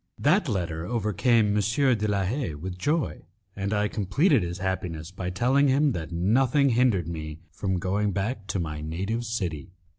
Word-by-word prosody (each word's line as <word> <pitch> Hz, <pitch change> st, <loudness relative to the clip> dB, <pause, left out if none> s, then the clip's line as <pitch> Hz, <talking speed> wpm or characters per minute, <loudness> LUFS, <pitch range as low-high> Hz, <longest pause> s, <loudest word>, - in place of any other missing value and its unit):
That 165 Hz, +2 st, +2 dB
letter 85 Hz, -6 st, -2 dB
overcame 105 Hz, +1 st, +2 dB
M. 105 Hz, -, +3 dB
de 115 Hz, 0 st, +2 dB
la 100 Hz, -2 st, +1 dB
Haye 100 Hz, -, -2 dB
with 90 Hz, +4 st, -6 dB
joy, 150 Hz, -, 0 dB, 0.3 s
and 100 Hz, +1 st, -3 dB
I 105 Hz, 0 st, +1 dB
completed 120 Hz, -, +2 dB
his 85 Hz, 0 st, -3 dB
happiness 90 Hz, -3 st, -3 dB
by 90 Hz, -1 st, -4 dB
telling 130 Hz, +9 st, +2 dB
him 140 Hz, +2 st, +3 dB
that 85 Hz, -6 st, -5 dB
nothing 125 Hz, -, +3 dB
hindered 115 Hz, -8 st, +2 dB
me 80 Hz, -2 st, -5 dB
from 95 Hz, +2 st, -2 dB
going 100 Hz, +4 st, 0 dB
back 100 Hz, +2 st, -3 dB
to 100 Hz, -, -2 dB
my 75 Hz, -3 st, -4 dB
native 95 Hz, +10 st, -3 dB
city. 90 Hz, -9 st, -4 dB
100 Hz, 170 wpm, -26 LUFS, 90-120 Hz, 0.3 s, M